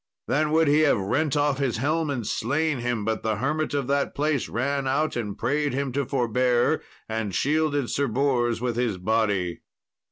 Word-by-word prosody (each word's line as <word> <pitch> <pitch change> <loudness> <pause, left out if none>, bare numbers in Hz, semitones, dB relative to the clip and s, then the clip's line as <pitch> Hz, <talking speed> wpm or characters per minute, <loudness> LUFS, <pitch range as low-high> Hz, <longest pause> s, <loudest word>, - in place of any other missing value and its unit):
Then 150 +2 +1
would 160 0 +4
he 145 +2 +4
have 150 -5 +4
rent 140 +10 0
off 145 -1 +1
his 130 -5 0
helm 155 +5 0
and 125 -6 -2
slain 145 +7 0
him, 120 -3 -2
but 110 0 -1
the 110 -1 0
hermit 145 +7 -1
of 140 -2 0
that 140 +2 0
place 150 -2 0
ran 140 +2 -1
out, 150 +4 0
and 105 -4 -3
prayed 145 +2 0
him 140 0 -1
to 140 0 -1
forbear, 125 -1 +1 0.3
and 110 -4 -3
shielded 145 -2 +1
Sir 140 0 0
Bors 120 -1 +1
with 120 -1 -2
his 120 -6 0
body. 100 -3 0
135 Hz, 185 wpm, -25 LUFS, 115-145 Hz, 0.3 s, would